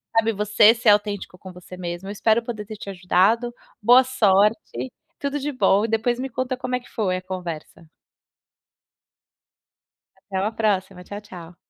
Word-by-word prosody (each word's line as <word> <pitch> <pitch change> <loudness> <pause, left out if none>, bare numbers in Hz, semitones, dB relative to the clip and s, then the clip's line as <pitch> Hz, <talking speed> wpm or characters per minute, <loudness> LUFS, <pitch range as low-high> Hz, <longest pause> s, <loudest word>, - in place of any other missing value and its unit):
sabe, 225 0 +3
você 210 +2 +5
ser 230 -1 +2
autêntico 205 -2 +1
com 185 - -10
você 180 0 -12
mesmo, 175 +1 -6
eu - - -4
espero 220 +3 +2
poder 225 -3 -6
ter 215 - -7
te 200 - -7
ajudado, 195 +6 +2 0.3
boa 245 +4 +7
sorte, 205 - +1 0.3
tudo 280 0 -2
de 290 +2 -3
bom 210 -6 +3
e 225 - 0
depois 225 +2 0
me 265 +2 -4
conta 255 +1 -2
como 255 0 -3
é - - -1
que 245 - -19
foi 190 -5 -1
a - - -6
conversa. 175 -3 -7 2.3
Até 190 -2 -5
uma 205 +3 0
próxima, 190 -4 -1
tchau 205 +3 -7
tchau. 180 -4 -12
210 Hz, 170 wpm, -23 LUFS, 185-230 Hz, 2.3 s, boa